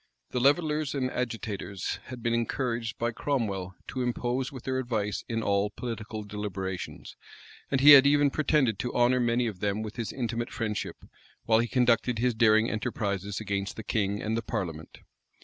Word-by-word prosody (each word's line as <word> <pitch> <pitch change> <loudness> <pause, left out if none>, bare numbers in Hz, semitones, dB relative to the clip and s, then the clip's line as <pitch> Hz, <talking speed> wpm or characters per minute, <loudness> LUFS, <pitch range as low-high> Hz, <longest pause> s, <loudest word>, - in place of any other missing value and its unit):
The 125 - 0
levellers 150 +2 +2
and 130 -2 -1
agitators 110 -5 -3
had 125 -2 -9
been 115 - +1
encouraged 115 -1 -1
by 120 0 0
Cromwell 100 -9 -2
to 130 - -3
interpose 125 +2 -1
with 130 -4 -9
their 130 0 -1
advice 110 -5 -2
in 115 -1 -1
all 100 0 +1
political 110 -1 -5
deliberations; 100 -3 -5 0.5
and 135 -1 +1
he 145 +2 +10
had 140 -1 +10
even 145 0 +4
pretended 135 -8 +2
to 120 - -3
honor 125 +1 +4
many 120 0 +2
of 105 -6 -4
them 105 +2 -1
with 110 +1 -7
his 115 -2 -3
intimate 120 -2 -3
friendship, 110 -2 -4 0.4
while 110 -1 +4
he 120 - +1
conducted 120 -1 +2
his 125 +2 +2
daring 110 0 +4
enterprises 100 -3 -2
against 100 -2 -3
the 110 - -7
king 100 -2 -1
and 110 +1 -1
the 115 - 0
parliament. 85 -9 -5
115 Hz, 170 wpm, -28 LUFS, 105-125 Hz, 0.5 s, he